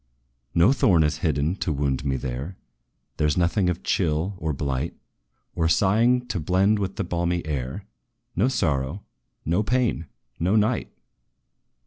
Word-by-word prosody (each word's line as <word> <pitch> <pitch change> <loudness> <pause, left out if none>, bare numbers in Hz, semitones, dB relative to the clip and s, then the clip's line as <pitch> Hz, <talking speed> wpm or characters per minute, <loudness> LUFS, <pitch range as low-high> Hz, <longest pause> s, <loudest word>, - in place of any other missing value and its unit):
"No 90 +10 +5
thorn 100 - +4
is 75 +1 0
hidden 75 +2 0
to 85 - -2
wound 70 -2 -1
me 70 -2 0
there; 65 +7 -5 0.6
There 75 - +2
's 75 - 0
nothing 90 +2 +2
of 90 0 -3
chill, 85 +2 0
or 80 0 -1
blight, 70 +1 -2 0.6
Or 80 -1 +1
sighing 115 +8 +3
to 100 - -1
blend 95 +6 +2
with 95 -1 -3
the - - -2
balmy 85 0 -1
air 75 +6 -4 0.5
No 100 +8 +3
sorrow 75 - -1 0.4
no 85 +6 +2
pain 120 -7 0 0.3
no 90 +5 +2
night!" 110 +3 +1
85 Hz, 145 wpm, -24 LUFS, 75-100 Hz, 0.6 s, No